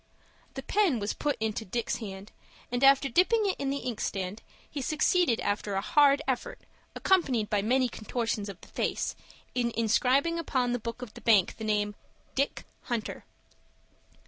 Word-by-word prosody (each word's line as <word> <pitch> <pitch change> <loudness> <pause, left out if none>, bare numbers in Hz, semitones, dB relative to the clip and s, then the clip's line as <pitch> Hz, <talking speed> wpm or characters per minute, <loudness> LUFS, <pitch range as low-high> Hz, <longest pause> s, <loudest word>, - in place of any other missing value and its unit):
The - - -5
pen 390 - +2
was 205 -1 -2
put 295 -1 -1
into 220 0 -2
Dick's 235 +4 -2
hand, 200 -2 -8 0.4
and, 245 +2 -1
after 275 0 +6
dipping 370 - +3
it 390 - +1
in 275 - -1
the 280 0 -3
inkstand, 205 -3 -3 0.3
he 285 - -5
succeeded 310 -1 +2
after 205 -1 -1
a 195 - +1
hard 285 +4 +4
effort, 275 - -2 0.4
accompanied 265 - +2
by 205 -1 +2
many 255 +5 +2
contortions 225 -2 -3
of 195 - -9
the - - -14
face, - - -2 0.4
in 240 -2 +1
inscribing 255 +9 +2
upon 255 -6 0
the 245 - 0
book 230 +2 -6
of 225 - -9
the - - -11
bank 210 -6 +4
the 220 - -7
name 210 -1 0 0.4
DICK 275 +1 -1 0.2
HUNTER. 235 -3 -3
245 Hz, 165 wpm, -29 LUFS, 215-280 Hz, 0.4 s, after